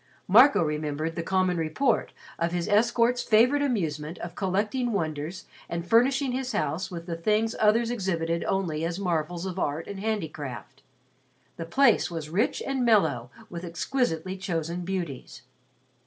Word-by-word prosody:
Marco 245 Hz, +2 st, +7 dB
remembered 150 Hz, +1 st, -2 dB
the -, -, -2 dB
common 185 Hz, 0 st, +1 dB
report 165 Hz, -, 0 dB, 0.3 s
of 170 Hz, 0 st, 0 dB
his 175 Hz, -1 st, -2 dB
escort's 235 Hz, +3 st, +3 dB
favorite 245 Hz, +7 st, +4 dB
amusement 165 Hz, -, -2 dB
of 175 Hz, -, -7 dB
collecting 210 Hz, +6 st, -1 dB
wonders 160 Hz, -1 st, -3 dB, 0.2 s
and 170 Hz, 0 st, -3 dB
furnishing 260 Hz, +5 st, +3 dB
his 255 Hz, 0 st, -3 dB
house 190 Hz, -3 st, -1 dB
with 170 Hz, -2 st, -7 dB
the 170 Hz, -2 st, -4 dB
things 215 Hz, +6 st, +1 dB
others 225 Hz, +2 st, +3 dB
exhibited 170 Hz, -7 st, -1 dB
only 170 Hz, -5 st, -1 dB
as 170 Hz, +1 st, -2 dB
marvels 175 Hz, -2 st, -2 dB
of 185 Hz, 0 st, -4 dB
art 150 Hz, +1 st, -1 dB
and 200 Hz, -1 st, -7 dB
handicraft. 150 Hz, -, -4 dB, 0.8 s
The 165 Hz, -, -5 dB
place 265 Hz, +5 st, +4 dB
was 160 Hz, -3 st, -6 dB
rich 205 Hz, +8 st, 0 dB
and 270 Hz, -2 st, -1 dB
mellow 160 Hz, -, +2 dB, 0.2 s
with 175 Hz, -5 st, -7 dB
exquisitely 185 Hz, 0 st, -2 dB
chosen 175 Hz, -1 st, -3 dB
beauties. 175 Hz, -11 st, -5 dB
185 Hz, 145 wpm, -27 LUFS, 165-225 Hz, 0.8 s, Marco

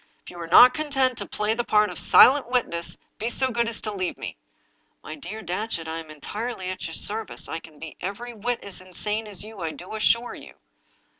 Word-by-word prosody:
If -, -, -11 dB
you 175 Hz, -, -11 dB
are 170 Hz, -, -5 dB
not 250 Hz, +9 st, +9 dB
content 270 Hz, -3 st, +1 dB
to -, -, -4 dB
play 210 Hz, +1 st, 0 dB
the 240 Hz, +1 st, -1 dB
part 210 Hz, -2 st, +3 dB
of -, -, -2 dB
silent 270 Hz, -1 st, +6 dB
witness, 170 Hz, -9 st, 0 dB, 0.2 s
be 225 Hz, +3 st, -1 dB
so 260 Hz, +2 st, +2 dB
good 235 Hz, -1 st, +1 dB
as 230 Hz, -, -6 dB
to 215 Hz, -, -2 dB
leave 185 Hz, -3 st, -3 dB
me." -, -, -6 dB, 0.4 s
" -, -, -43 dB
My 155 Hz, -, -7 dB
dear 180 Hz, +8 st, -8 dB
Datchet, 180 Hz, -1 st, -2 dB
I'm 160 Hz, 0 st, -5 dB
entirely 190 Hz, +6 st, -5 dB
at 185 Hz, -1 st, -5 dB
your 165 Hz, -, -6 dB
service. 220 Hz, +1 st, -2 dB
I 165 Hz, -, -4 dB
can 160 Hz, -2 st, -15 dB
be 160 Hz, 0 st, -9 dB
every 235 Hz, +6 st, -5 dB
whit 235 Hz, +2 st, -3 dB
as 195 Hz, -2 st, -6 dB
insane 210 Hz, +4 st, -4 dB
as 205 Hz, -2 st, +1 dB
you, 220 Hz, -2 st, -11 dB
I 165 Hz, -, -1 dB
do 180 Hz, +4 st, -10 dB
assure 230 Hz, +2 st, +2 dB
you." -, -, -12 dB
210 Hz, 220 wpm, -25 LUFS, 175-235 Hz, 0.4 s, not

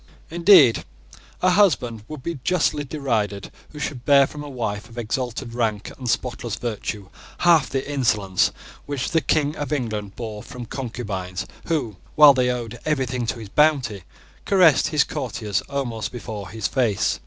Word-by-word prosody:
Indeed 170 Hz, -, +6 dB, 0.6 s
a 185 Hz, -, +5 dB
husband 125 Hz, -, +2 dB
would 155 Hz, -4 st, -8 dB
be 170 Hz, -4 st, -4 dB
justly 175 Hz, -5 st, +1 dB
derided 115 Hz, -9 st, -2 dB, 0.2 s
who 150 Hz, -, -13 dB
should 140 Hz, -4 st, -4 dB
bear 140 Hz, 0 st, +6 dB
from 150 Hz, +2 st, -8 dB
a 145 Hz, -, -8 dB
wife 110 Hz, -6 st, -4 dB
of 120 Hz, -, -15 dB
exalted 120 Hz, +1 st, -3 dB
rank 110 Hz, -4 st, -1 dB
and 125 Hz, -2 st, -5 dB
spotless 120 Hz, -2 st, -2 dB
virtue 105 Hz, -3 st, -5 dB, 0.3 s
half 165 Hz, -6 st, +4 dB
the 135 Hz, 0 st, -2 dB
insolence 105 Hz, -9 st, +1 dB, 0.4 s
which 140 Hz, -3 st, -3 dB
the 165 Hz, -2 st, +3 dB
King 145 Hz, +2 st, +1 dB
of 145 Hz, -1 st, -4 dB
England 110 Hz, -8 st, -3 dB
bore 110 Hz, -3 st, -6 dB
from 125 Hz, +2 st, -8 dB
concubines 105 Hz, -8 st, -5 dB, 0.2 s
who, 135 Hz, -, -1 dB, 0.2 s
while 150 Hz, -2 st, +9 dB
they 125 Hz, -1 st, +1 dB
owed 120 Hz, -2 st, -4 dB
everything 130 Hz, -5 st, -1 dB
to 120 Hz, -, -2 dB
his 110 Hz, -3 st, -9 dB
bounty, 130 Hz, -9 st, +2 dB, 0.4 s
caressed 180 Hz, -7 st, +5 dB
his 150 Hz, -2 st, +3 dB
courtiers 115 Hz, -8 st, -3 dB
almost 120 Hz, -6 st, -3 dB
before 110 Hz, -6 st, -7 dB
his 110 Hz, +2 st, -2 dB
face. 120 Hz, -7 st, 0 dB
125 Hz, 155 wpm, -23 LUFS, 110-145 Hz, 0.6 s, while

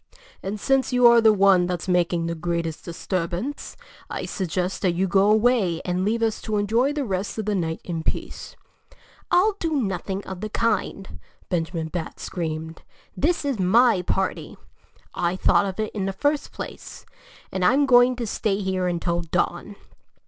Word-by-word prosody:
And 200 Hz, +2 st, -4 dB
since 270 Hz, +4 st, +1 dB
you 250 Hz, -1 st, +3 dB
are 235 Hz, -1 st, +8 dB
the 220 Hz, -1 st, +6 dB
one 195 Hz, -3 st, +4 dB
that's 180 Hz, -1 st, -3 dB
making 175 Hz, -2 st, +1 dB
the 170 Hz, -, -2 dB
greatest 170 Hz, -1 st, -3 dB
disturbance, 180 Hz, +8 st, -4 dB, 0.3 s
I'd -, -, -5 dB
suggest 180 Hz, 0 st, -2 dB
that 185 Hz, -3 st, +2 dB
you 190 Hz, +2 st, +1 dB
go 195 Hz, +2 st, +3 dB
away 215 Hz, -6 st, +3 dB
and 180 Hz, +1 st, -1 dB
leave 225 Hz, +3 st, 0 dB
us 225 Hz, -1 st, 0 dB
to 215 Hz, -1 st, -2 dB
enjoy 225 Hz, +7 st, +2 dB
the 290 Hz, -2 st, -2 dB
rest 195 Hz, 0 st, -3 dB
of 215 Hz, -, -3 dB
the 210 Hz, -, 0 dB
night 165 Hz, -4 st, -2 dB
in 165 Hz, -2 st, -4 dB
peace." -, -, -5 dB, 0.7 s
"I'll 385 Hz, +5 st, +4 dB
do 325 Hz, -2 st, -1 dB
nothing 195 Hz, -2 st, -3 dB
of 190 Hz, -1 st, -8 dB
the 215 Hz, -, -4 dB
kind!" 210 Hz, -3 st, -2 dB, 0.3 s
Benjamin 165 Hz, -2 st, -2 dB
Bat 165 Hz, -1 st, -5 dB
screamed. 160 Hz, -1 st, -5 dB, 0.3 s
"This 315 Hz, -, 0 dB
is 275 Hz, -6 st, -1 dB
my 215 Hz, +2 st, +4 dB
party. 190 Hz, +2 st, -2 dB, 0.6 s
I 175 Hz, +1 st, 0 dB
thought 200 Hz, -, +3 dB
of 190 Hz, +2 st, -6 dB
it 215 Hz, -1 st, -2 dB
in 195 Hz, -2 st, -2 dB
the 195 Hz, -, -2 dB
first 290 Hz, +8 st, -1 dB
place. -, -, -9 dB, 0.5 s
And 190 Hz, -, -2 dB
I'm 270 Hz, +10 st, +4 dB
going 250 Hz, -1 st, +5 dB
to 240 Hz, -1 st, -4 dB
stay 210 Hz, -2 st, -1 dB
here 190 Hz, -2 st, -1 dB
until 175 Hz, 0 st, -1 dB
dawn." 175 Hz, +4 st, -2 dB
195 Hz, 170 wpm, -24 LUFS, 175-225 Hz, 0.7 s, are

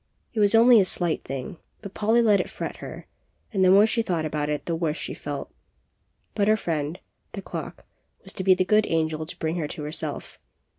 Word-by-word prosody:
It 225 Hz, -, -2 dB
was 205 Hz, +1 st, +4 dB
only 235 Hz, 0 st, +7 dB
a 195 Hz, -, +4 dB
slight 175 Hz, -3 st, -1 dB
thing, 135 Hz, +4 st, -6 dB, 0.3 s
but 200 Hz, -2 st, -8 dB
Polly 225 Hz, +3 st, +2 dB
let 210 Hz, -3 st, +4 dB
it -, -, -2 dB
fret -, -, -6 dB
her; -, -, -9 dB, 0.5 s
and 190 Hz, -2 st, +2 dB
the 185 Hz, -, +6 dB
more 200 Hz, +3 st, +7 dB
she 225 Hz, +1 st, 0 dB
thought 170 Hz, -7 st, -1 dB
about 150 Hz, -1 st, -2 dB
it 150 Hz, -1 st, -2 dB
the 170 Hz, -, -1 dB
worse 160 Hz, -2 st, -1 dB
she -, -, -5 dB
felt. -, -, -6 dB, 0.8 s
But 205 Hz, -1 st, +1 dB
her 215 Hz, 0 st, +4 dB
friend, 160 Hz, -2 st, -3 dB, 0.3 s
the -, -, -5 dB
clock, -, -, -7 dB, 0.4 s
was -, -, -6 dB
to 190 Hz, -, -4 dB
be 185 Hz, 0 st, +5 dB
the 185 Hz, 0 st, +1 dB
good 215 Hz, +2 st, +3 dB
angel 160 Hz, -1 st, -1 dB
to -, -, -7 dB
bring 160 Hz, +2 st, -2 dB
her 155 Hz, -3 st, -2 dB
to 150 Hz, -, -7 dB
herself. 150 Hz, +2 st, -6 dB
180 Hz, 215 wpm, -25 LUFS, 155-210 Hz, 0.8 s, only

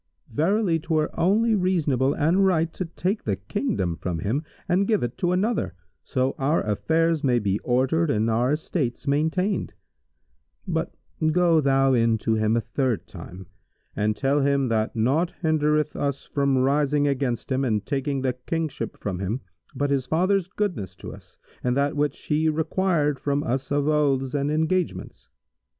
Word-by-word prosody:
Verily 175 Hz, -, +2 dB
'twere 155 Hz, -1 st, 0 dB
only 220 Hz, +6 st, +3 dB
reasonable 155 Hz, -, +1 dB
and 170 Hz, +6 st, +2 dB
right 165 Hz, -4 st, +2 dB
to 185 Hz, -, -4 dB
take 185 Hz, +5 st, -2 dB
the 100 Hz, -, 0 dB
Kingdom 95 Hz, -2 st, -2 dB
from 90 Hz, 0 st, -3 dB
him 110 Hz, -, -1 dB, 0.2 s
and 190 Hz, +2 st, +2 dB
give 215 Hz, -, +2 dB
it 120 Hz, 0 st, -3 dB
to 175 Hz, -, +1 dB
another, 195 Hz, -, 0 dB, 0.3 s
so 130 Hz, +1 st, 0 dB
our 140 Hz, +4 st, +1 dB
affairs 160 Hz, +9 st, +1 dB
may 125 Hz, -3 st, +3 dB
be 100 Hz, -3 st, 0 dB
ordered 135 Hz, +7 st, +1 dB
and 110 Hz, -4 st, +1 dB
our 120 Hz, +4 st, +2 dB
estates 150 Hz, -5 st, -2 dB
maintained; 160 Hz, +7 st, 0 dB, 0.9 s
but -, -, -2 dB, 0.4 s
go 170 Hz, -1 st, +4 dB
thou 135 Hz, -1 st, +3 dB
in 115 Hz, -2 st, +3 dB
to 110 Hz, +1 st, -1 dB
him 110 Hz, +1 st, +2 dB
a -, -, +1 dB
third 130 Hz, -2 st, -1 dB
time 90 Hz, +1 st, -10 dB, 0.5 s
and 105 Hz, +1 st, 0 dB
tell 140 Hz, +4 st, +1 dB
him 140 Hz, -2 st, +2 dB
that 110 Hz, 0 st, 0 dB
naught 140 Hz, +10 st, +1 dB
hindereth 150 Hz, -1 st, +1 dB
us 140 Hz, -1 st, -2 dB
from 140 Hz, -2 st, 0 dB
rising 145 Hz, +2 st, +2 dB
against 135 Hz, -3 st, -1 dB
him 130 Hz, +1 st, +1 dB
and 105 Hz, -5 st, 0 dB
taking 140 Hz, -1 st, -2 dB
the 130 Hz, -1 st, +1 dB
Kingship 135 Hz, -1 st, -4 dB
from 95 Hz, -3 st, -4 dB
him 100 Hz, +7 st, -2 dB, 0.3 s
but 145 Hz, 0 st, 0 dB
his 135 Hz, -2 st, 0 dB
father's 185 Hz, +4 st, +1 dB
goodness 180 Hz, -, -3 dB
to -, -, -9 dB
us -, -, -16 dB, 0.3 s
and 125 Hz, +1 st, +1 dB
that 140 Hz, +2 st, +1 dB
which 145 Hz, 0 st, -1 dB
he 155 Hz, +1 st, +2 dB
required 155 Hz, -2 st, 0 dB
from 145 Hz, 0 st, 0 dB
us 130 Hz, +1 st, -2 dB
of 145 Hz, 0 st, +1 dB
oaths 140 Hz, -4 st, +1 dB
and 140 Hz, 0 st, 0 dB
engagements. 160 Hz, +4 st, -1 dB
140 Hz, 165 wpm, -24 LUFS, 125-160 Hz, 0.9 s, go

